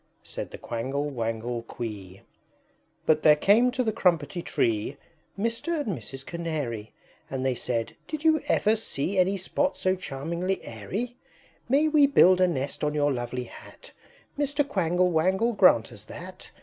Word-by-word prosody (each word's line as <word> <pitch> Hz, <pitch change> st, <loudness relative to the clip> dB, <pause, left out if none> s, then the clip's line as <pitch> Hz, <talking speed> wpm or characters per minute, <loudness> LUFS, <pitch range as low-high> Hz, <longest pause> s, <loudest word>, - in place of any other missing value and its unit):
Said -, -, -6 dB
the -, -, -9 dB
Quangle 135 Hz, +5 st, -3 dB
Wangle 115 Hz, -1 st, -3 dB
Quee. 105 Hz, -5 st, -7 dB
III. -, -, -20 dB, 0.8 s
But 155 Hz, -1 st, +3 dB
there 150 Hz, -, +7 dB
came 210 Hz, +10 st, +4 dB
to 255 Hz, 0 st, -1 dB
the 220 Hz, -2 st, 0 dB
Crumpetty 175 Hz, -5 st, +1 dB
Tree 115 Hz, -1 st, -1 dB, 0.4 s
Mr. 230 Hz, +10 st, -1 dB
and 220 Hz, -, -2 dB
Mrs. 135 Hz, +3 st, -7 dB
Canary; 150 Hz, -11 st, -4 dB, 0.4 s
And 130 Hz, 0 st, -3 dB
they 130 Hz, -, +2 dB
said, 115 Hz, -2 st, -3 dB
"Did 310 Hz, 0 st, -5 dB, 0.2 s
ever -, -, +2 dB
you -, -, +4 dB
see 185 Hz, -2 st, -2 dB
Any 190 Hz, +2 st, +3 dB
spot 280 Hz, +10 st, -1 dB
so 185 Hz, 0 st, +1 dB
charmingly 170 Hz, +3 st, -3 dB
airy? 200 Hz, -, -5 dB, 0.5 s
May 285 Hz, +5 st, +4 dB
we 300 Hz, -2 st, +5 dB
build 185 Hz, -9 st, +6 dB
a 185 Hz, -, +6 dB
nest 140 Hz, -4 st, -3 dB
on 150 Hz, 0 st, 0 dB
your 145 Hz, -1 st, +2 dB
lovely 120 Hz, 0 st, -3 dB
Hat? -, -, -12 dB, 0.5 s
Mr. 285 Hz, 0 st, +1 dB
Quangle 180 Hz, -, +1 dB
Wangle, 190 Hz, +8 st, +2 dB
grant 180 Hz, -, +5 dB
us 110 Hz, -4 st, -9 dB
that! 180 Hz, +10 st, -10 dB
170 Hz, 160 wpm, -27 LUFS, 125-205 Hz, 0.8 s, there